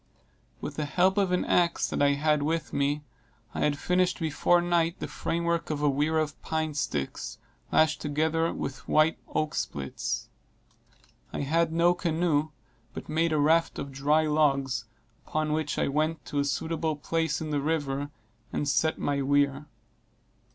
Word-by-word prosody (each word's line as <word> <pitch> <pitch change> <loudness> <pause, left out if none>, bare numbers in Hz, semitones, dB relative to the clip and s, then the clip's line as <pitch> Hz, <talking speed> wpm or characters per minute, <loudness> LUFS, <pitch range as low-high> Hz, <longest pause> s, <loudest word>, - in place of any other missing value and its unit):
With - - -6
the 150 - -1
help 185 +6 +2
of 195 -2 +1
an 180 - +1
axe 175 -1 +2
that - - -1
I 140 0 +5
had 150 +1 +2
with 160 +2 -1
me, 145 +1 0 0.5
I - - -4
had 145 -1 +1
finished 180 +3 +1
before 165 +2 +2
night 170 -1 +1
the - - -5
frame 170 +1 -2
work 170 0 0
of 150 -1 -2
a 145 - +4
weir 150 +3 +1
of 155 -1 -2
pine 160 -1 -2
sticks, 75 - -3 0.3
lashed 155 -1 +3
together 160 +3 +1
with 135 -2 -5
white 155 +1 +3 0.2
oak 155 -1 0
splits. 70 -1 -3 1.0
I - - -3
had 165 +3 +1
no 170 +2 +4
canoe, 160 -3 0 0.5
but - - -7
made 165 +1 +1
a 155 - +2
raft 160 +3 +3
of 140 - -5
dry 145 +4 +2
logs, 140 -5 +1 0.4
upon 155 0 0
which 155 -1 -1
I - - +1
went 155 +2 -1
to 145 - -2
a 140 - +1
suitable 160 +2 -1
place 160 +1 -1
in 155 -1 -4
the 145 -1 0
river 145 -2 -1 0.4
and 145 - -2
set 160 +2 +2
my 140 -1 -1
weir. 140 +1 +1
155 Hz, 165 wpm, -28 LUFS, 145-165 Hz, 1.0 s, I